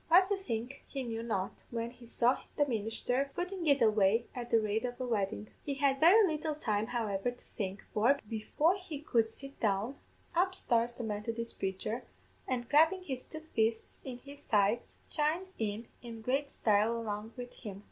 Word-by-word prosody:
What 370 +3 +6
to 405 - +3
think 255 - -4
he 270 -2 -3
knew 230 -2 -3
not, 200 -5 -2
when 230 0 -3
he 245 -1 -14
saw 240 +2 +3 0.2
the 290 - +5
ministher 245 +4 0
footing 360 -1 -2
it 280 -3 +5
away 215 +1 +4
at 240 -1 -5
the 230 - +5
rate 215 +1 0
of 245 -1 -3
a 255 - -1
weddin'. 210 -2 -1
He 280 -2 -2
had 275 -1 +2
very 390 +8 +8
little 310 -2 -1
time, 215 -6 0
however, 225 -3 0
to 245 - -10
think; 195 -2 -4
for, 240 +7 +4
before 290 - +1
he 355 -7 -6
could 235 -6 +2
sit 275 +5 -11
down, 215 +5 0 0.4
up 370 +2 +3
starts 235 0 +1
the 240 - -6
Methodist 225 +2 -3
praicher, 195 +5 -2 0.5
and 245 -2 -1
clappin' 325 +5 +5
his 265 -7 -4
two 315 +3 -9
fists 225 0 0
in 255 -2 -6
his 280 +3 -12
sides 210 +1 +1
chimes 335 +5 0
in 220 +1 -2
in 230 -2 -8
great 275 +4 +1
style 215 -1 +2
along 220 0 -4
wid 245 0 -6
him. 200 -4 -8
240 Hz, 185 wpm, -33 LUFS, 220-285 Hz, 0.5 s, very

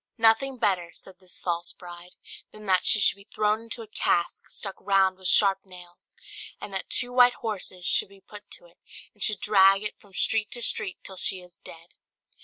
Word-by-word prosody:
"Nothing 230 +4 +3
better," 185 -7 +1
said 185 -1 -10
this 185 -1 -8
false 170 -1 -3
bride, 175 0 -12 0.4
"than 215 0 -12
that 185 -2 +3
she 215 - +5
should 200 - +4
be 200 - -18
thrown 215 +1 +1
into 230 0 -3
a - - -13
cask 175 -4 -1
stuck 195 -2 -3
round 195 -1 +3
with 190 0 -5
sharp 195 -1 +4
nails, 180 -2 -10 0.4
and 200 - -7
that 190 - -4
two 245 0 0
white 245 0 +6
horses 190 -5 -4
should - - +2
be 195 0 -17
put 205 +2 -14
to - - -5
it, - - -23 0.3
and - - -21
should 215 -3 +2
drag 195 -1 +5
it 210 - -6
from 200 -2 -21
street 215 +1 +1
to 240 -2 -2
street 185 -4 -1
till 190 - -9
she 185 0 +1
is 180 -1 -18
dead." 165 +1 -12
195 Hz, 205 wpm, -26 LUFS, 185-215 Hz, 0.4 s, white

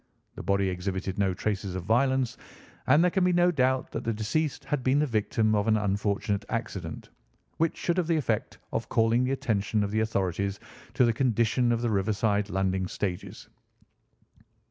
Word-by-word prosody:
The - - -8
body 100 0 +1
exhibited 95 +1 -3
no 95 -2 +1
traces 100 -1 -2
of 95 - -4
violence, 130 +4 +2 0.5
and 145 +6 +5
there 180 - +3
can 190 0 +1
be 180 0 +3
no 175 0 +4
doubt 130 -4 +1
that - - -4
the 115 - 0
deceased 140 +8 -1
had 145 -2 -1
been 130 +2 +3
the 150 - +3
victim 110 -2 +1
of 105 0 +1
an 110 -1 +4
unfortunate 100 0 -1
accident, 95 -8 -4 0.5
which 165 0 0
should 175 0 -1
have 175 -3 +1
the 165 -1 +2
effect 115 -8 -1 0.2
of - - -2
calling 115 +2 +3
the 130 - -1
attention 110 -4 0
of 100 - -2
the 110 - +1
authorities 100 -2 -1 0.4
to 125 - +5
the 115 - +2
condition 120 0 +2
of 120 0 0
the 120 - +1
riverside 105 0 +1
landing 95 -1 0
stages. 90 -2 -5
110 Hz, 180 wpm, -27 LUFS, 100-130 Hz, 0.5 s, and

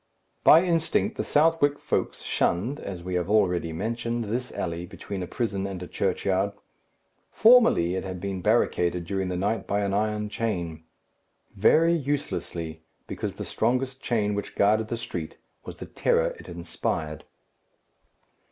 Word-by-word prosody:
By 165 +3 +8
instinct 165 -3 +1
the - - -2
Southwark 150 -2 +3
folks - - -2
shunned, 115 - 0
as 90 -3 -6
we 90 +1 -4
have 90 +1 -1
already 90 -6 +2
mentioned, 115 +6 -2
this 120 +4 -3
alley 85 -1 -3
between 95 0 -6
a 90 - -4
prison 100 -4 -2
and 95 -2 -6
a - - -7
churchyard. 95 +1 0 0.8
Formerly 225 - +5
it 95 - -2
had 95 -1 -5
been 95 0 -4
barricaded 90 -5 +1
during 95 +1 -2
the 90 - -2
night 100 +2 -1
by 100 +1 0
an 100 -1 -1
iron 105 +1 0
chain. 85 -8 -3 0.7
Very 160 - +5
uselessly; 130 - -3 0.2
because - - -4
the - - -5
strongest 130 +1 -1
chain 105 -4 0
which 100 0 -4
guarded 110 +2 +3
the 115 - -3
street 85 -9 -6 0.3
was - - -8
the - - -7
terror - - +1
it - - -11
inspired. 85 -3 -3
100 Hz, 150 wpm, -26 LUFS, 90-120 Hz, 0.8 s, By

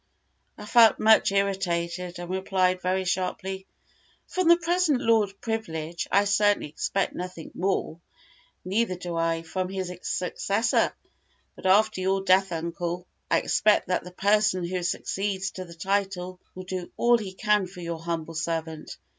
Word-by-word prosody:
I 210 - -9
felt 225 0 +6
much 220 -2 +5
irritated, 180 -3 -1
and 175 0 -6
replied 185 0 0
very 185 +1 0
sharply, 190 +1 -2 0.6
"From 370 -2 -1
the 340 0 +8
present 345 -5 +1
Lord 215 -4 +2
Privilege 170 -8 -3
I 200 +1 +5
certainly 205 -4 +2
expect 195 +6 -1
nothing 180 -3 -7
more, 185 -3 -1 0.7
neither 195 +1 0
do 175 -1 -5
I 165 0 0
from 185 +3 -3
his 190 -2 -4
successor; 200 +4 0 0.6
but - - -4
after 210 +1 +4
your 190 +1 +1
death, 190 0 +4
uncle, 170 +1 -3 0.2
I - - +3
expect 210 -3 +2
that 180 - 0
the 180 - -9
person 205 0 +2
who 180 +1 -2
succeeds 195 +2 -2
to 185 - -7
the 170 -1 -12
title 185 0 -2 0.2
will 185 - -7
do 185 -1 -5
all 240 0 +4
he 195 -4 -6
can 210 -1 +2
for 180 0 -11
your 170 -1 -4
humble 165 -1 -4
servant. 160 -1 -4
185 Hz, 150 wpm, -26 LUFS, 175-205 Hz, 0.7 s, the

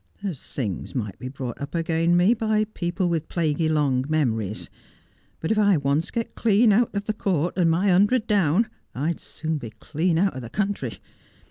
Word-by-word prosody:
There's 180 -9 -4
things 105 -5 -5
might 105 -6 -3
be 130 - -6
brought 130 -2 -6
up 140 +3 -5
again 165 +1 +2
me 185 +6 +5
by 220 -2 +1
people 180 -4 -2
with 165 -2 -1
plaguey 160 -1 0
long 140 -5 +2
memories; 115 -9 -1 0.7
but 160 - -2
if 220 - +2
I 200 -4 +4
once 140 +3 0
get 230 -1 -3
clean 220 0 +4
out 225 +1 +2
of 200 0 -2
the 215 - -1
court 180 -5 0
and 175 -3 +3
my 180 +5 +2
hundred 205 +6 +4
down, 200 -1 +3 0.3
I'd 155 +7 -1
soon 160 -1 -4
be 115 - -7
clean 160 +10 -1
out 195 +3 +2
o' - - -4
the 115 -3 -8
country. 195 - -2
165 Hz, 190 wpm, -24 LUFS, 140-200 Hz, 0.7 s, me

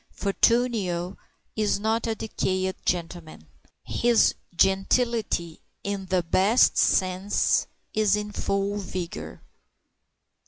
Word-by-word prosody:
Fortunio 200 -4 0 0.4
is 210 -2 0
not 220 +2 0
a 225 - -1
decayed 190 -4 -2
gentleman. 165 - -3 0.4
His 235 -2 +3 0.2
gentility, 195 -2 +1 0.2
in 200 -1 -4
the 185 -1 +1
best 195 +8 +3
sense, 185 +2 +2 0.3
is 215 -2 +3
in 210 0 -4
full 200 0 -1
vigor. 185 -1 -6
195 Hz, 90 wpm, -25 LUFS, 185-215 Hz, 0.4 s, His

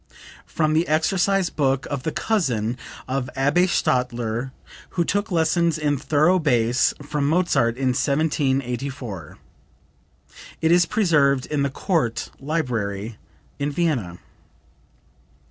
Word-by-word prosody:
(From 155 -1 0
the 160 +2 +2
exercise 180 +4 +1
book 135 -2 0
of 140 -2 -2
the 160 - -2
cousin 125 - 0 0.3
of 130 0 -2
Abbe 145 +7 +3
Stadler 120 -5 0 0.5
who 170 - +2
took 205 +5 -1
lessons 165 -1 +2
in 150 -2 0
thorough 155 +6 +2
bass 120 -5 +2
from 145 -1 -1
Mozart 140 -9 +2
in 130 -1 +1
1784. 135 - -1 1.2
It 160 - +2
is 175 0 +5
preserved 150 -11 +2
in 150 -2 -2
the 140 - +1
Court 135 - -1
Library 115 -8 -3 0.4
in 145 +1 -1
Vienna.) 140 - -1
140 Hz, 110 wpm, -23 LUFS, 125-165 Hz, 1.2 s, is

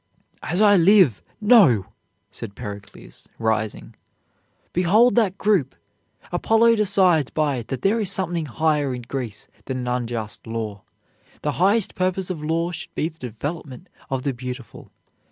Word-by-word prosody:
"As 175 +6 -1
I 205 -2 +6
live, 180 - +5 0.2
no!" 200 - +5 0.5
said 100 - -9
Pericles, 100 -4 -10
rising. 110 -1 -2 0.8
"Behold 210 +8 +4
that 205 -5 +2
group! 190 - +1 0.6
Apollo 225 +5 +3
decides 185 -8 +3
by 150 -4 0
it 115 - -6
that 130 - -5
there 210 +4 +2
is 205 -4 0
something 175 -5 -2
higher 145 -1 0
in 125 - -8
Greece 120 -4 -6 0.2
than 130 - -3
an 125 -1 -4
unjust 120 -4 -4
law. 110 -3 -4 0.6
The 150 - 0
highest 200 +2 +3
purpose 185 0 -1
of 160 -4 -6
law 165 +2 0
should 175 - -8
be 160 - 0
the 160 -1 -23
development 130 +3 -6 0.2
of 130 -1 -2
the 140 - -1
beautiful. 125 0 -8
155 Hz, 145 wpm, -22 LUFS, 125-190 Hz, 0.8 s, I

